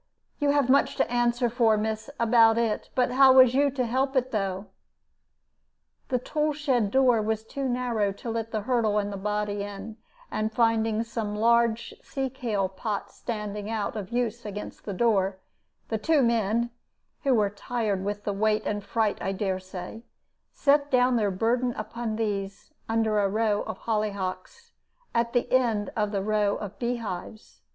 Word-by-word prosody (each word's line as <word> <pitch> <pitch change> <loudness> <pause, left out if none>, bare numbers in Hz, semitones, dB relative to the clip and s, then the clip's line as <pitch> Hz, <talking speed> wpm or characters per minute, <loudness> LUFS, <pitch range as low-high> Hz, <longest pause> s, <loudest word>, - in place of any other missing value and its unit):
You 290 -1 +2
have 285 -2 +3
much 275 +2 +3
to - - 0
answer 240 0 +2
for, 230 -2 +3
miss, 220 +1 -3
about 230 -1 +5
it; 230 -2 -1
but 250 -1 +2
how 265 +1 +7
was 255 -2 +7
you 280 +2 +3
to 260 -2 -1
help 265 +4 0
it, 260 0 +1
though? 195 -2 -2 1.4
"The 255 - +2
tool 300 +4 -1
shed 265 -8 +1
door 250 -2 +4
was 220 0 -1
too 270 +4 -4
narrow 240 -5 0
to 230 +3 -6
let 225 0 -3
the 220 -2 -2
hurdle 225 -2 +1
and 205 -1 -1
the - - -4
body 210 0 -2
in, 205 +2 -7 0.3
and 215 0 -1
finding 225 -1 +2
some 225 -2 -4
large 235 - +2
sea 270 - -3
kale 225 -7 -1
pots 200 +2 -4
standing 210 -2 -5
out 220 0 -2
of 200 -3 -5
use 240 -1 -2
against 210 0 -7
the 200 - -3
door, 195 -3 +2 0.5
the 220 - -1
two 300 +3 +3
men 235 0 +1 0.5
(who 270 -2 +3
were 205 -3 +2
tired 210 -2 -2
with 205 +1 -3
the 205 - -1
weight 215 +1 +1
and 205 -1 -2
fright, 215 +1 0
I 195 - -1
dare 190 -1 -1
say) 185 +3 -8 0.5
set 285 0 +2
down 250 -1 +3
their 210 -3 +2
burden 235 +6 0
upon 220 +1 -4
these, 200 +3 -3 0.2
under 225 -1 +2
a 200 -1 +2
row 215 0 +1
of - - -5
hollyhocks, 210 - -3 0.4
at 235 0 0
the 245 - 0
end 230 -5 +2
of 210 -2 0
the 200 -2 -1
row 210 -1 +1
of 205 -1 -7
bee 240 +1 0
hives. 215 -1 -7
225 Hz, 175 wpm, -27 LUFS, 205-245 Hz, 1.4 s, how